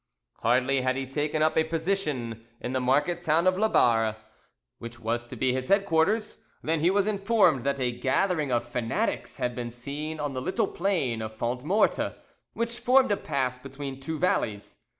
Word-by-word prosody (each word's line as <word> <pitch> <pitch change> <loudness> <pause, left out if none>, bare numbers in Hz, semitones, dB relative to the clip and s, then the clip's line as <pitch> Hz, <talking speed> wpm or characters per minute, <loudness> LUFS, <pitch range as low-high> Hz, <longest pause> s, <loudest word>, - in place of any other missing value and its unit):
Hardly 130 +3 +2
had 130 0 +1
he 135 0 -2
taken 150 +3 -1
up 155 - +2
a 160 - +4
position 155 - -2
in 125 - -4
the 130 - +1
market 145 +7 +1
town 165 +1 +2
of 185 - +5
Labarre, 115 - +3 0.6
which 115 0 -9
was 120 +2 -2
to 130 - -8
be 130 +1 +1
his 130 0 -2
headquarters, 200 +2 +2 0.3
than 160 0 0
he 165 +3 +3
was 195 +1 +2
informed 200 - +3
that 140 0 0
a 125 -1 +1
gathering 140 +5 0
of 120 -1 0
fanatics 120 -2 -2
had 125 - -1
been 120 -1 -4
seen 145 +6 -6
on 145 -2 -2
the 130 - -3
little 205 - 0
plain 170 - -1
of 110 0 -6
Fondmorte, 130 - +1 0.4
which 235 +1 -3
formed 255 -2 +4
a - - +4
pass 125 -2 -2
between 135 0 -7
two 155 +4 -4
valleys. 110 - -1
140 Hz, 175 wpm, -27 LUFS, 125-175 Hz, 0.6 s, of